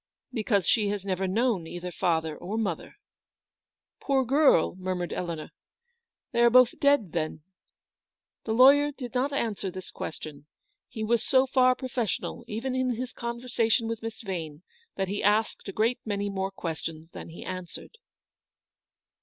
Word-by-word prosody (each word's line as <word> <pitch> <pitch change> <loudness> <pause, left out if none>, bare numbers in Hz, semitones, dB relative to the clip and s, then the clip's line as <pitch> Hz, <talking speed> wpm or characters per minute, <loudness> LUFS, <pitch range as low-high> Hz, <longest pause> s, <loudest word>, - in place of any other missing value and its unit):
" - - -44
Because 215 -5 +1
she 215 -3 +3
has 200 -1 -3
never 190 -1 -1
known 210 -3 +1
either 175 +1 -6
father 160 -2 0
or 200 +8 -5
mother." 195 -8 -3 0.5
" - - -66
Poor 270 -2 +2
girl! 275 - +4
" - - -15
murmured 185 -1 -2
Eleanor; 170 -3 -4 0.4
" 470 0 -55
they 235 - +1
are 235 - +7
both 250 0 +5
dead, 280 - +3
then? 155 -2 -3 0.5
" - - -66
The 220 - -2
lawyer 280 +5 +7
did 255 -4 -8
not 260 +3 +1
answer 220 -8 -2
this 185 0 -8
question. 150 -2 -7 0.4
He 220 - -5
was 230 +1 +2
so 260 0 +4
far 255 -1 +4
professional, 250 -5 -3
even 235 +5 -3
in 255 -1 0
his 255 +2 -5
conversation 235 -1 0
with 230 -1 -3
Miss 225 0 -6
Yane, 165 -5 -5 0.3
that 195 -1 -1
he 200 +2 -2
asked 210 +2 +1
a - - -3
great 225 +5 +1
many 205 -1 -2
more 190 0 -2
questions 165 -3 -5
than - - -9
he 165 - -9
answered. 185 - -7
215 Hz, 165 wpm, -28 LUFS, 180-250 Hz, 0.5 s, are